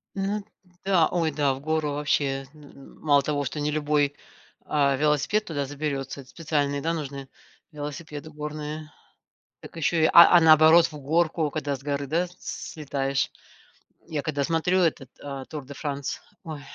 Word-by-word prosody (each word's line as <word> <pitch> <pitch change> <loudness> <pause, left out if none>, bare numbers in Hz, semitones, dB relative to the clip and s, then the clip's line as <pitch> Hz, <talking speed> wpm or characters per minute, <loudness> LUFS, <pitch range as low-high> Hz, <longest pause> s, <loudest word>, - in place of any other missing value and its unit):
Мгм. 200 +1 -2 0.4
Да 185 -5 +4
ой, 165 -2 +1
да, 145 -2 +1
в 135 - -9
гору 155 -1 -1
вообще, 140 -2 0
н 150 -1 -15
н 140 -1 -15
мало 145 -2 +4
того, 145 0 -1
что 145 +3 -4
не 150 +1 0
любой, 145 -1 +1 0.5
а, 140 -2 +2
велосипед 150 +9 +1
туда 145 -4 -2
заберется. 140 -1 -4
Эт 130 - -15
специальные, 145 -3 -1
да, 165 - 0
нужны 140 -4 -5 0.4
велосипеды 150 +1 -7
горные, 150 0 -6 0.7
так - - -12
еще, 160 0 +2
а, 170 +1 +9
а, 175 - +7
наоборот 160 +1 +7
в 150 - -10
горку, 160 +2 +1
когда 145 -1 -2
с 135 - -16
горы, 140 -1 -2
да, 170 +5 0
слетаешь. 140 -3 -3 0.8
Я 150 -3 -3
когда 145 -2 -1
смотрю 170 +4 +1
этот, 155 -6 0
а, 140 -2 -6
Тур 150 -3 -7
де 140 - -9
Франс, 140 -1 -4 0.2
ой 155 -3 -6
150 Hz, 160 wpm, -26 LUFS, 140-160 Hz, 0.8 s, а